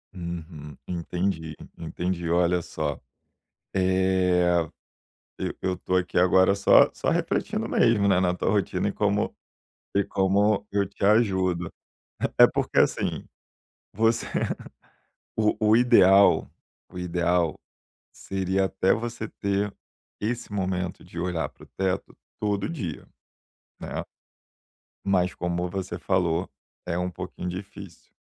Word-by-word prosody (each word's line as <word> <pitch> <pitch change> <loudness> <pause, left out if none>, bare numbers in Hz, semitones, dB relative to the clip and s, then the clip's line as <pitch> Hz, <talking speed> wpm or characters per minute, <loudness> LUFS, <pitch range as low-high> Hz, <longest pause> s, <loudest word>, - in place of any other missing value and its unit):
Uhum. 80 -4 -7
Entendi, 85 -2 -3 0.2
entendi, 85 +1 -3
olha 90 +1 +2
só, - - -4 0.8
eh, 95 -2 +3 0.8
eu - - -3
eu 95 - 0
estou 90 0 -1
aqui 90 -1 -2
agora 95 +2 +5
só 100 - +6
só - - -1
refletindo - - -1
mesmo, 105 -3 +3
né, 95 -2 +4
na 90 -1 +2
tua 90 - -1
rotina 100 -1 0
e - - 0
como 105 0 0 0.6
e 100 - +4
como 100 +2 +1
eu 100 0 +1
te 100 +1 -9
ajudo. 95 -5 +2 0.7
É - - +10
porque, - - -1
assim, - - +1 0.7
você 115 +2 +2 1.1
o 105 -1 +2
o 105 +1 +5
ideal 100 -7 +5 0.4
o 90 - -9
ideal 85 -2 +1 0.6
seria 95 0 -1
até 95 0 +1
você 115 -1 -4
ter 100 0 0 0.5
esse 115 +1 -3
momento 90 -2 -2
de 85 - -10
olhar 85 -2 -1
para - - -17
o - - -20
teto 95 0 -2 0.2
todo 100 -2 -1
dia, 95 - -5 0.7
né? - - -5 1.0
Mas 90 -2 +1
como 90 0 -2
você 95 -1 -4
falou, 90 -2 0 0.4
é 85 0 -1
um 90 0 -1
pouquinho 90 0 -6
difícil, 95 +3 -9
95 Hz, 120 wpm, -26 LUFS, 90-100 Hz, 1.1 s, É